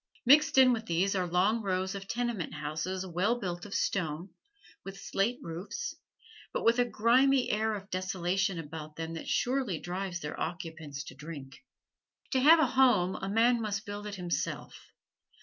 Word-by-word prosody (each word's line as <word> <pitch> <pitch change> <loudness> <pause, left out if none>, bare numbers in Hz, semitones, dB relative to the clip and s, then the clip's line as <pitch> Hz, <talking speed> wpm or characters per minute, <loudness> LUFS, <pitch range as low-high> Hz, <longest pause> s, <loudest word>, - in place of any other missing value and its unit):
Mixed 290 +3 +6
in 260 -1 +7
with 225 -1 -4
these 180 +4 +1
are 185 -2 0
long 190 +6 +2
rows 190 -1 -1
of 195 -1 -7
tenement 235 -8 -2
houses 160 +6 -3
well 190 +7 0
built 175 -2 -4
of 200 - -6
stone, 170 -1 -1 0.5
with 195 0 -8
slate 220 +6 0
roofs, 180 - -5 0.6
but - - -2
with 230 +1 +4
a 245 - +4
grimy 250 +4 +3
air 220 +1 +1
of 200 -1 -8
desolation 185 0 -1
about 155 -1 -7
them 165 +1 -5
that 165 - -7
surely 250 -8 0
drives 180 0 -4
their 150 -2 -6
occupants 160 -4 -5
to 140 - -10
drink. 140 - -10 0.7
To 265 - +2
have 310 +6 +8
a 315 - +5
home 245 -9 +3
a 195 - -4
man 230 +3 +3
must 205 -2 -3
build 205 0 -6
it 205 - -5
himself. 175 -2 -3
195 Hz, 165 wpm, -30 LUFS, 170-230 Hz, 0.7 s, have